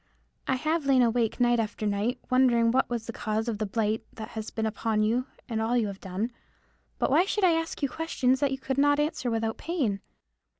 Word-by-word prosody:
I 265 - +2
have 310 +2 -1
lain 260 -2 +5
awake 230 -1 +1
night 240 -1 +3
after 215 -1 -2
night, 210 +5 0
wondering 240 -3 +4
what 260 +2 +2
was 235 -2 -3
the 230 - -6
cause 220 +1 -2
of 220 -3 -2
the 215 - -1
blight 220 +1 0
that 220 +1 -7
has 220 -2 -5
been 220 - -2
upon 220 0 0
you 240 +5 +1 0.2
and 225 -3 -2
all 235 +2 +1
you 230 - +2
have 200 -1 -6
done. 195 +5 -3 0.7
But - - 0
why 325 +6 +5
should 410 +1 -1
I 365 - +6
ask 325 -2 -2
you - - +4
questions 265 -4 0
that 285 -1 +1
you 270 - -1
could 265 0 -2
not 290 +1 +4
answer 295 -4 -1
without 225 -1 -1
pain? 260 - -1
240 Hz, 220 wpm, -27 LUFS, 220-270 Hz, 0.7 s, I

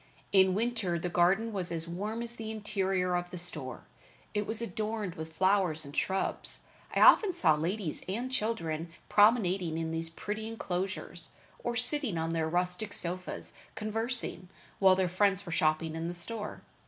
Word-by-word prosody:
In 190 -1 +5
winter 220 -5 0
the 175 +2 -2
garden 190 +6 +3
was 185 -3 -2
as 165 0 -1
warm 210 +7 -3
as 235 0 -5
the 220 -1 -6
interior 195 -4 0
of 175 0 -2
the 180 - -7
store. 155 -7 -2 0.5
It 210 -1 -1
was 220 - -1
adorned 215 -2 -3
with 160 0 -7
flowers 185 -4 +2
and 140 - -9
shrubs. 190 0 -1 0.3
I - - +3
often 390 -5 +7
saw 160 -4 +5
ladies 165 +2 -2
and 240 +7 -2
children 170 -9 -2 0.2
promenading 195 -6 +4
in 165 0 -2
these 165 0 -3
pretty 210 +6 -5
inclosures, 195 -4 -4 0.3
or 240 - -1
sitting 260 - +3
on 165 0 -1
their 160 -1 0
rustic 180 +4 -1
sofas 180 +1 -2 0.2
conversing, 225 -4 -2 0.3
while 190 -1 +7
their 185 -1 +2
friends 195 +2 +2
were 170 - -6
shopping 155 0 +1
in 165 +1 -3
the 175 - -4
store. 210 +4 -5
185 Hz, 165 wpm, -31 LUFS, 170-215 Hz, 0.5 s, often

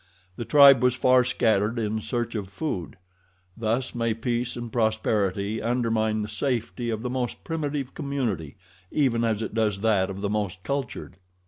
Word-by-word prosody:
The 120 - -5
tribe 140 -2 +8
was 125 0 +3
far 130 0 +4
scattered 115 -2 +1
in 110 -1 -1
search 120 0 -3
of 100 -4 -4
food. 95 - -4 0.6
Thus 115 +3 -1
may 115 -2 0
peace 120 +1 -2
and 120 -2 -6
prosperity 110 -2 0
undermine 110 -2 0
the - - -4
safety 120 +1 -2
of 110 0 -3
the 125 - -2
most 125 -2 -3
primitive 145 -4 -3
community 120 - -3 0.3
even 125 -6 +1
as 110 -1 0
it 110 - -5
does 105 -3 0
that 100 -4 +2
of 95 0 -6
the 100 - 0
most 100 -4 -2
cultured. 140 -2 -4
115 Hz, 160 wpm, -26 LUFS, 105-125 Hz, 0.6 s, tribe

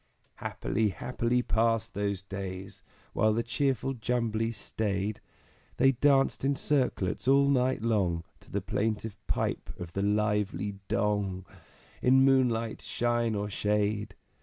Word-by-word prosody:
_" - - -41 0.3
Happily, 105 +2 -1
happily 125 +4 -1
passed 115 0 +1
those 100 -2 -2
days! 95 0 -6 0.3
While 110 0 +3
the 115 +2 0
cheerful 135 +2 0
Jumblies 115 -2 -1
staid; 100 -1 -2 0.6
They 135 +2 +5
danced 135 +1 +3
in 140 +1 +2
circlets 130 -9 0
all 140 +1 +5
night 130 -4 +2
long, 95 -7 +1 0.2
To - - -20
the - - -2
plaintive 110 -1 -2
pipe - - -1
of 85 -1 -7
the 100 - -1
lively 105 -1 0
Dong, 100 -2 0 0.6
In 130 +1 +5
moonlight, 120 -4 +2
shine, 120 -2 0
or 100 0 -1
shade. 105 0 -1
110 Hz, 130 wpm, -29 LUFS, 100-125 Hz, 0.6 s, They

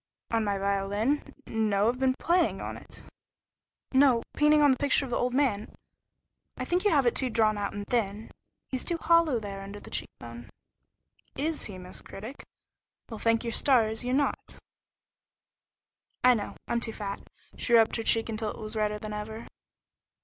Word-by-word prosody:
"On 225 -1 +2
my 200 -1 0
violin? 200 +7 0
No, 215 -2 +1
I've 245 +2 0
been 260 -1 +2
playing 345 +5 +1
on - - -5
it." - - -13 0.9
"No! 260 -3 +5
Painting 300 0 +4
on 290 - +6
the 260 - +2
picture 285 0 +2
of 255 - -8
your - - 0
old 250 0 0
man. 245 -7 0 0.8
I - - -3
think 355 +1 0
you 415 - +4
have 285 -7 +3
it 240 - +3
too 260 - +2
drawn 220 -2 +2
out 205 -1 -3
and 205 0 -5
thin. 215 -2 -2 0.4
He's 260 -1 -3
too 340 - -2
hollow 330 -5 +3
there 200 -2 -6
under 200 +1 -8
the - - -13
cheek - - -3
bone." 120 0 -10 0.9
"Is 310 +3 -2
he, 195 -3 -7
Miss 180 0 -8
Critic? 225 +8 -9 0.7
Well, 220 - -6
thank 230 0 +2
your 230 -1 -3
stars 225 -4 +2
you're 250 +1 0
not." 285 +1 -1 1.7
"I 250 0 +7
know. 210 -4 -3
I'm 235 - 0
too 230 -1 -3
fat." 200 -2 -5 0.3
She 240 - -2
rubbed 225 -1 +5
her - - -2
cheek 225 0 +2
until 220 -1 -3
it - - -7
was 215 0 -7
redder 210 -1 0
than 210 0 -6
ever. 220 +2 -6
225 Hz, 180 wpm, -28 LUFS, 210-265 Hz, 1.7 s, I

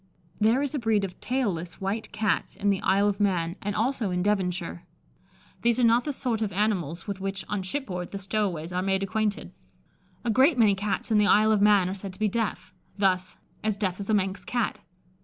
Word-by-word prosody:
There 225 +6 +3
is 285 - -2
a 290 - -1
breed 220 -4 +1
of 185 -2 -5
tail 250 -5 0
less 170 0 -6
white 200 +3 -3
Cats 215 -1 -1
in 205 0 +1
the 195 - -1
Isle 200 +2 +3
of 205 0 -1
Man, 180 -4 +1
and 205 0 -3
also 230 -1 0
in 180 0 -1
Devonshire. 180 -4 -1 0.8
These 235 +1 +2
are - - +3
not 235 +1 +4
the 295 - -1
sort 245 -5 -2
of 210 -2 -1
animals 185 -5 -1
with 200 -2 -5
which, 195 0 -3
on 205 -2 -2
shipboard, 185 -4 -4
the 200 - -5
"stow 205 +2 0
aways" 165 0 -6
are 180 - 0
made 195 0 0
acquainted. 210 +2 -2 0.7
A 235 - +2
great 265 +6 +4
many 215 -4 +5
Cats 200 +2 -2
in 215 - +5
the 210 - +4
Isle 215 +2 +5
of 210 -2 +3
Man 205 -3 +5
are 185 - -2
said 195 -1 -7
to 190 - -16
be 215 - +2
deaf. 225 0 -3 0.2
Thus, 185 -2 +1 0.3
"As 215 -1 0
deaf 190 -3 -2
as 200 - -5
a 215 - +4
Manx 190 -1 -1
Cat." 240 -3 -1
205 Hz, 220 wpm, -27 LUFS, 190-220 Hz, 0.8 s, many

